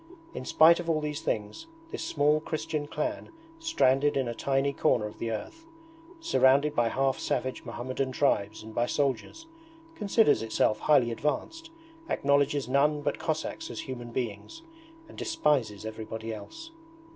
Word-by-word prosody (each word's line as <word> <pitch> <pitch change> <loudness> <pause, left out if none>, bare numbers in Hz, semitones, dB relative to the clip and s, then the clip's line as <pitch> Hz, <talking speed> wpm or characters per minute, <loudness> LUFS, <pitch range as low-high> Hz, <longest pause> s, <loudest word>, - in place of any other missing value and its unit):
In - - -6
spite 165 +2 +6
of 170 -1 -4
all 160 -2 +2
these 150 0 -4
things 105 - -3 0.2
this - - -5
small 150 0 +2
Christian 155 -1 -3
clan 310 - -3 0.3
stranded 145 - +2
in 130 -2 0
a 120 - -2
tiny 135 +3 0
corner 120 -8 +2
of 105 - -8
the 115 - -2
earth, 115 - -6 0.6
surrounded 145 - +3
by 120 -1 +3
half 135 +2 0
savage 130 0 -2
Mohammedan 130 +2 -3
tribes 110 -6 0
and 110 0 -10
by 120 +2 +1
soldiers, 140 - -1 0.5
considers 215 - +3
itself 110 -1 +1
highly 135 -6 +4
advanced, 150 - -3 0.4
acknowledges 140 -1 +2
none 145 +3 +2
but - - -1
Cossacks 165 - -3
as - - -5
human 125 -3 -7
beings, 120 - -5 0.4
and - - -14
despises 135 - 0
everybody 110 +1 -5
else. 325 - -10
140 Hz, 145 wpm, -28 LUFS, 120-155 Hz, 0.6 s, spite